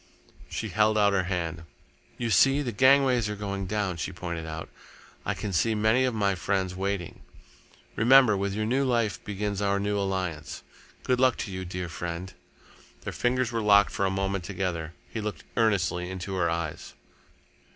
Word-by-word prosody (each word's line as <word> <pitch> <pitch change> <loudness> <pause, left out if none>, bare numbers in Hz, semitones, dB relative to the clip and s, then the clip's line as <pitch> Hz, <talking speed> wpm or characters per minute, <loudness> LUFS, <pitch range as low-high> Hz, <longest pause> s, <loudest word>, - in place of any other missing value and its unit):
She - - -4
held 110 0 +2
out 100 -1 +4
her 95 -2 +1
hand. 85 -3 -3 0.6
"You 115 -1 -2
see, 135 +9 +5
the 125 - -2
gangways 130 -1 +4
are 105 - -3
going 100 -1 -4
down," 100 -3 -1
she 85 - -3
pointed 85 -2 -5
out. 80 0 -6 0.6
"I - - 0
can 100 - -4
see 110 +6 +2
many 110 +5 +3
of 125 -3 -1
my 100 -2 +2
friends 95 0 -1
waiting. 95 -2 -3 0.7
Remember, 125 -1 +6
with 100 0 -2
your 110 0 -1
new 130 +5 +1
life 115 -6 0
begins 105 -1 -3
our 100 0 +1
new 100 0 0
alliance. 90 -7 -3 0.4
Good 125 -1 +1
luck 130 -1 +4
to 100 - -8
you, 95 0 -5
dear 90 0 -4
friend!" 85 +2 -5 0.7
Their - - -5
fingers 125 -1 0
were 115 -1 -1
locked 100 -1 +5
for 100 - 0
a - - +1
moment 95 0 -1
together. 90 -4 -3
He 110 - -5
looked 105 -8 -5
earnestly 90 -5 +1
into 95 +1 -5
her 90 -3 +1
eyes. 80 -2 -4
100 Hz, 175 wpm, -27 LUFS, 90-110 Hz, 0.7 s, Remember